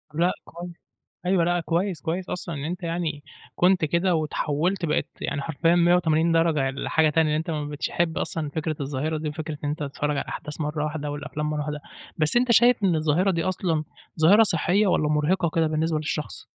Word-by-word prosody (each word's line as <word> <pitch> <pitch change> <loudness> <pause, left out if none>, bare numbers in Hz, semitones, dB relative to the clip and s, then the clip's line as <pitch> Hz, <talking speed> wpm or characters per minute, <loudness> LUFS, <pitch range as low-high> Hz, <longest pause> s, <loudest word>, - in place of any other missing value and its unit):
لأ 175 +3 +3
كويس، 175 +1 -9 0.6
أيوه 180 -2 +3
لأ 175 0 +1
كويس، 170 +1 -1
كويس 175 +3 -3
أصلًا 175 -1 -4
إن 140 0 -5
أنت 175 +3 -4
يعني 165 -3 -3 0.3
كنت 180 -1 +3
كده 170 +3 +1
واتحولت 160 +3 -1
بقيت 150 - 0
يعني 140 - -2
حرفيًا 165 +2 +1
180 170 -2 +3
درجة 160 -5 +2
لحاجة 155 +3 +1
تانية، 160 0 +2
إن 150 - +1
أنت 160 +2 -3
ما 150 -2 -2
بقيتش 145 0 -3
تحب 170 -2 -1
أصلًا 155 -2 -3
فكرة 155 +1 -3
الظاهرة 145 +3 -2
دي، 155 0 -3
وفكرة 155 0 -5
إن - - 0
أنت 150 +1 -3
تتفرّج 145 +1 -2
على - - 0
الأحداث 150 +1 -7
مرّه 150 0 -2
واحدة، 150 -1 -3
والأفلام 150 +1 -4
مرّه 150 -1 -2
واحدة، 150 0 -4 0.4
بس 155 +7 +2
أنت 245 0 +4
شايف 240 -1 +5
إن 180 - +3
الظاهرة 160 +5 +2
دي 165 -3 0
أصلًا 175 -4 -1 0.4
ظاهرة 200 +8 +7
صحية، 195 +1 +2
والَّا 155 -5 +2
مرهقة 155 +4 +1
كده 165 -1 +3
بالنسبة 155 +1 0
للشخص؟ 150 0 -4
160 Hz, 195 wpm, -25 LUFS, 150-175 Hz, 0.6 s, ظاهرة